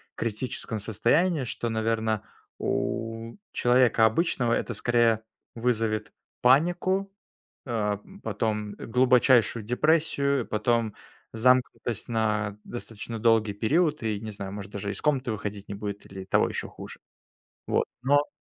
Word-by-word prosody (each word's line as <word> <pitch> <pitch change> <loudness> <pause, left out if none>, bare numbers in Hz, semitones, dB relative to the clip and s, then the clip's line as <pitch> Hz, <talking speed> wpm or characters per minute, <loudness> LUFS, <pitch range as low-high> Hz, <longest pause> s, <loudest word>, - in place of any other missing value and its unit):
критическом 115 0 -3
состоянии, 140 - +2
что, 120 -1 -3
наверно, 110 -1 0 0.4
у 115 0 -2 0.2
человека 120 -2 +4
обычного 120 - +2
это, 115 - -1
скорее, 115 0 +2 0.3
вызовет 115 -2 -1 0.3
панику, 175 +9 +3 0.5
а 105 -5 -1 0.2
потом, 105 -2 -2
э, - - -8
глубочайшую 125 -2 +4
депрессию, 140 0 +2
потом 115 0 0 0.4
замкнутость 125 -1 +1
на 110 -2 0
достаточно 115 -1 -6
долгий 110 -2 +3
период, 150 - +1
и, 110 -2 -1
не 110 0 -6
знаю, 100 -2 -6
может 100 -1 -7
даже 100 0 -4
из 100 - -8
комнаты 135 -5 +1
выходить 105 -1 -5
не - - -3
будет 100 0 -5
или 95 0 -8
того - - +2
еще - - -3
хуже. - - -10 0.7
Вот. - - +1 0.2
Но 145 +3 +3
115 Hz, 125 wpm, -27 LUFS, 105-125 Hz, 0.7 s, человека